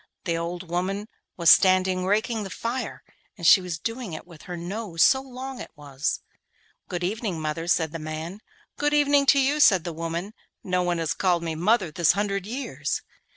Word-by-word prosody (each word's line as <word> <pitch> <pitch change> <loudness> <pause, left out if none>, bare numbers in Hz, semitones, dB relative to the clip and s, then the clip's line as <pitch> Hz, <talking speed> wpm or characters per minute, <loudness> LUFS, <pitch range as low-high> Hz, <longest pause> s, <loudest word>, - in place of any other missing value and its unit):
The 170 - -1
old 170 +2 -4
woman 190 +5 -2 0.3
was 170 -2 +6
standing 185 -1 +4
raking 220 +3 +1
the 195 - -5
fire, 235 +6 -4 0.3
and 170 - -6
she 190 - +8
was 180 -3 -4
doing 230 0 -5
it 155 - -7
with 170 -4 -14
her 175 - -4
nose, 175 -1 -1
so 265 - +5
long 260 -1 -7
it - - -8
was. 145 -1 -3 0.7
'Good 175 -1 -3
evening, 200 -2 -2
mother,' 155 +2 -3
said 160 -3 +2
the 165 - -5
man. 155 +5 -6 0.4
'Good 295 0 +1
evening 285 -1 +4
to 280 - +6
you,' 280 +3 +2
said 190 - +6
the 170 - -4
old 160 - -11
woman. 170 +5 -3 0.3
'No 180 -1 0
one 175 -1 0
has 160 -5 -1
called 175 -3 +1
me 165 -1 -2
mother 185 +2 +1
this 170 +1 +3
hundred 200 0 -2
years. 260 +5 -3
185 Hz, 195 wpm, -25 LUFS, 165-220 Hz, 0.7 s, she